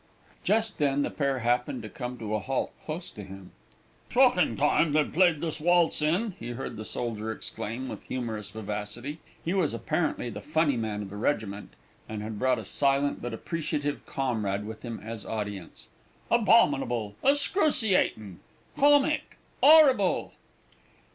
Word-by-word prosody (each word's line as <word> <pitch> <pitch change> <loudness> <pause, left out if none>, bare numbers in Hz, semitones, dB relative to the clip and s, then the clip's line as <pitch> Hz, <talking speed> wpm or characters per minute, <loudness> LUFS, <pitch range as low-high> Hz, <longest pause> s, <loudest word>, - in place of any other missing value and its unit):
Just 220 -1 +1
then 145 -1 +2
the - - -2
pair 140 -2 0
happened 125 - 0
to - - -5
come 125 -2 -6
to 110 -2 -5
a 110 - +1
halt 130 +6 -2
close 165 +3 -6
to 105 - -9
him. 95 -1 -11 0.6
"Shockin' - - +4
time 155 -3 +3
they're 150 -1 +4
playing 175 -3 +3
this 160 -1 -3
waltz 175 -1 +3
in," 180 +9 +1
he 120 +1 -5
heard 130 - -5
the 110 - -6
soldier 110 -2 -2
exclaim 115 +3 -5
with - - -7
humorous 110 -5 -4
vivacity 110 +7 -5 0.3
(he 170 - 0
was 185 -6 +1
apparently 155 -6 -1
the 105 0 -7
funny 150 +3 +1
man 110 -3 -3
of 95 - -9
the 105 - -7
regiment, 105 -4 -2 0.4
and 105 -1 -5
had 110 -1 -5
brought 130 -1 +2
a 110 - -6
silent 140 +6 +1
but 120 - -4
appreciative 145 +3 -3
comrade 105 -7 -1
with 110 0 -8
him 115 -2 -6
as 115 -1 -6
audience), 105 -5 -6 0.4
"abominable! 140 - +3
excruciatin'! 245 - +2 0.4
comic!! 290 +2 +3 0.2
'orrible!!!" 275 - +6
130 Hz, 150 wpm, -28 LUFS, 110-165 Hz, 0.6 s, orrible